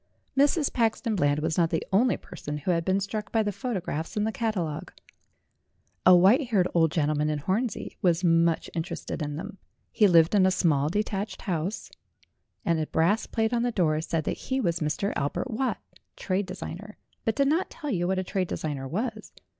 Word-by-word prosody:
Mrs. 285 +2 +3
Paxton 230 -1 +1
Bland 145 -6 +1
was 160 +2 0
not 165 -1 +3
the 160 - -1
only 235 +6 +4
person 150 0 -7
who 150 +5 -1
had 170 -1 +1
been 190 +3 +1
struck 210 +2 -4
by 225 -1 +2
the 205 - -1
photographs 185 - -4
in 210 - +2
the 220 - 0
catalogue. 195 -10 -2 1.2
A 185 - +9
white 215 - +5
haired 195 -6 +2
old 165 -2 +4
gentleman 150 -1 +1
in 150 - 0
Hornsey 195 - -2
was 175 -1 +2
much 165 -1 +3
interested 165 0 -4
in 145 -1 -3
them. 195 +5 -7 0.3
He 210 - +4
lived 165 -1 +5
in 190 -2 +5
a - - +5
small 155 -6 +2
detached 205 +2 -2
house, 180 +2 -3 0.7
and 165 -1 +2
a 155 - -1
brass 190 +7 +1
plate 225 0 0
on 235 - +2
the 245 0 +1
door 155 -7 +1
said 160 -1 -2
that - - -2
he 265 0 +1
was 170 -8 0
Mr. 155 +6 -1
Albert 145 - -2
Watt, 255 +4 -1 0.4
trade 190 +1 -1
designer, 205 +3 -7 0.3
but 225 - 0
did 275 -1 +2
not 325 +6 +1
tell 295 -4 -5
you 175 -3 0
what 190 +1 0
a 185 - 0
trade 185 0 -2
designer 145 -5 -4
was. 215 - -4
185 Hz, 195 wpm, -27 LUFS, 160-220 Hz, 1.2 s, A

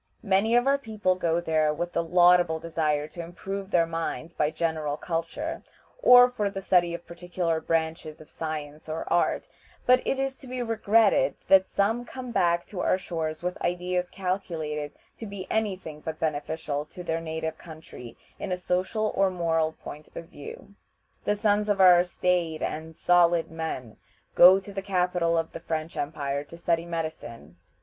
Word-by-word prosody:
Many 205 +3 +2
of 245 +1 +4
our 275 +1 +3
people 215 -7 0
go 170 -2 0
there 155 -2 +1
with 175 +3 -4
the 170 - +1
laudable 175 -1 +4
desire 155 -2 -1
to 170 - -7
improve 195 +3 -6
their 170 -4 +3
minds 165 0 -4
by 150 - +1
general 155 -2 -2
culture, 170 - -4 0.4
or 245 - +9
for 215 -5 -2
the 195 - -5
study 175 -2 +3
of 170 - -10
particular 170 -1 -2
branches 160 -1 -2
of 155 - -13
science 155 -1 -6
or 160 +1 -3
art, 175 - +1 0.4
but 255 0 +5
it 270 - +1
is 270 0 -1
to 265 - -13
be 250 0 -3
regretted 225 -2 +3
that 190 -1 +6
some 225 +5 0
come 250 0 -8
back 175 -5 +2
to 195 - -8
our 185 - +2
shores 160 -3 -4
with 180 0 -3
ideas 180 0 -1
calculated 165 -6 -3 0.3
to 225 - -6
be 200 -2 -7
any 220 -3 +1
thing 160 -5 -10
but 160 +1 -6
beneficial 150 -1 -2
to 180 +3 -10
their 165 -1 -2
native 160 0 -4
country 155 -7 -11 0.2
in 195 - -4
a 180 - 0
social 185 +4 -1
or 195 0 +3
moral 165 -3 0
point 150 +1 -9
of 165 0 -8
view. 145 +5 -11 0.5
The 205 - +2
sons 210 0 +1
of 205 -1 +1
our 180 -2 +7
staid 175 -3 -1
and 160 +1 -4
"solid 175 -1 +3
men" 160 -8 -5 0.4
go 185 +2 +8
to 200 +1 -11
the 195 - -3
capital 180 -3 +1
of 165 0 -1
the - - -7
French 160 0 -4
empire 145 -1 -3
to 170 - -12
study 170 0 0
medicine. 120 - -6
170 Hz, 175 wpm, -27 LUFS, 160-195 Hz, 0.5 s, or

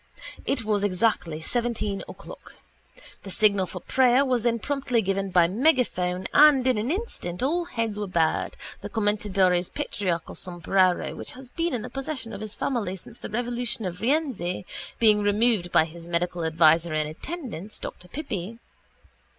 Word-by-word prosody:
It 240 -5 0
was 210 -2 +1
exactly 185 -5 0
seventeen 220 -1 -1
o'clock. - - -11 0.7
The 195 - -9
signal 200 -1 +3
for 180 - -7
prayer 260 +1 +4
was 250 -3 +1
then 235 0 +1
promptly 250 -2 0
given 195 0 -1
by 175 -2 +5
megaphone 190 - +1
and 290 -3 +7
in 255 -4 +2
an 225 +4 -2
instant 295 - -3
all 340 +6 +1
heads 230 -10 -3
were 205 - -2
bared, 165 -3 0 0.2
the - - -6
commendatore's 200 -4 +1
patriarchal 175 -5 -3
sombrero, 180 0 +1
which - - -7
has 255 -1 -11
been 335 -4 -1
in 225 - -4
the - - -6
possession 270 -4 -4
of 200 - -7
his 215 0 -6
family 215 -6 -2
since 220 +5 -12
the - - -7
revolution 240 -1 -2
of 180 -1 -5
Rienzi, 235 - 0 0.3
being 215 -2 +5
removed 205 -3 +3
by 160 - +5
his 165 +1 -11
medical 175 0 -1
adviser 160 0 +4
in 155 0 +1
attendance, 215 - -6
Dr 180 - -8
Pippi. 220 - -5
210 Hz, 160 wpm, -26 LUFS, 180-245 Hz, 0.7 s, and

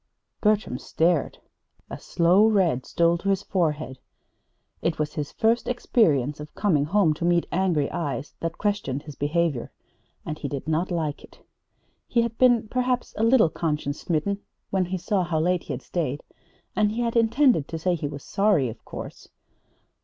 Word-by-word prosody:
Bertram 210 - +1
stared. 165 -2 0 0.5
A - - -7
slow 180 +5 +4
red 185 - +2
stole 170 0 +2
to 195 - -2
his 195 0 +1
forehead. 155 -9 -1 0.8
It 165 - 0
was 150 0 -2
his 150 -2 -4
first 230 +2 +1
experience 150 - +1
of 150 0 -9
coming 160 -9 +2
home 175 -1 +3
to 160 - -6
meet 175 0 +3
angry 170 -6 +1
eyes 145 -3 -3
that 165 0 -4
questioned 200 -10 -1
his 150 -2 -10
behavior 150 -3 -1 0.5
and 155 - -5
he 145 - -3
did 140 +1 -5
not 160 +3 0
like 160 -5 -2
it. - - -18 0.6
He 235 - +2
had 230 -1 -3
been, 245 -3 +4
perhaps, 250 +1 -1
a - - -3
little 230 -8 +5
conscience 150 -3 -2
smitten 185 +5 -1 0.3
when 190 -2 +1
he 185 +2 -3
saw 190 +1 0
how 165 -2 -1
late 180 +2 +1
he 145 - -4
had 130 - -6
stayed; 150 -5 -3 0.5
and 210 0 +2
he 235 - -2
had 235 0 -1
intended 230 - +3
to 165 - -5
say 180 +3 0
he 155 -4 -2
was 140 -1 -8
sorry, 195 - +2
of 110 - -10
course. - - -9
170 Hz, 175 wpm, -25 LUFS, 150-205 Hz, 0.8 s, little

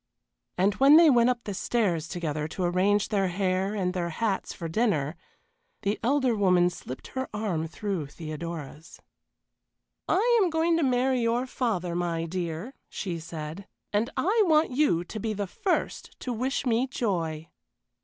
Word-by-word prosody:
And 195 +3 +3
when 280 +3 +8
they 330 -2 +7
went 240 -1 +5
up 240 -1 -1
the 205 - -4
stairs 185 -6 0
together 155 -3 -3
to 180 +4 -4
arrange 190 +4 +2
their 195 -3 +1
hair 190 +2 0
and 180 -3 -1
their 175 -2 -2
hats 200 +3 -1
for 165 - -6
dinner, 160 - 0 0.7
the 200 +1 0
elder 260 -1 +2
woman 180 -3 +3
slipped 130 -6 -8
her 260 0 -4
arm 185 -7 -1
through 180 -2 -3
Theodora's. 155 0 -7 1.1
"I 470 +4 +4
am 370 - +3
going 325 +1 +2
to - - +1
marry 255 -1 +2
your 235 +2 +1
father, 210 -9 -2
my 170 -1 -1
dear," 175 +6 -4 0.2
she 175 -4 -4
said, 160 +4 -7 0.3
"and 215 +4 +1
I 425 +6 +3
want 310 -3 +4
you 250 - +2
to 215 +5 -7
be 220 +1 -2
the 205 0 -2
first 360 - -2
to 250 - -3
wish 260 +4 -1
me 240 +1 +2
joy." 170 - -2
200 Hz, 160 wpm, -27 LUFS, 170-245 Hz, 1.1 s, when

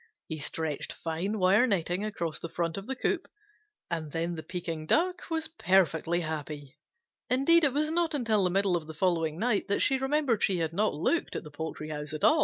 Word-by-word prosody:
He 160 -1 -5
stretched 150 +1 -3
fine 175 +6 -3
wire 200 +6 +5
netting 180 -2 0
across 170 -7 -3
the 165 - -6
front 170 -1 -2
of 195 +1 -6
the 265 - -2
coop, 340 +7 -1 0.6
and 160 -3 -3
then 165 +2 -1
the 160 - -5
Pekin 165 -3 -5
Duck 360 - +1
was 320 -1 -1
perfectly 175 - +2
happy. 150 -3 -5 0.5
Indeed 295 +7 +5
it 280 -4 +4
was 305 +2 +1
not 330 -1 +1
until 225 -7 +2
the 180 - +3
middle 195 0 +2
of 160 -3 -3
the 160 - -8
following 165 -2 +1
night 220 +1 +1
that 200 - +1
she 270 -2 +3
remembered 265 -4 +1
she 190 - +2
had 165 -1 -1
not 210 +5 +1
looked 330 - 0
at - - -3
the 150 - -11
poultry 155 0 -5
house 150 -1 -5
at 155 - -5
all. 310 - +6
180 Hz, 205 wpm, -29 LUFS, 160-250 Hz, 0.6 s, all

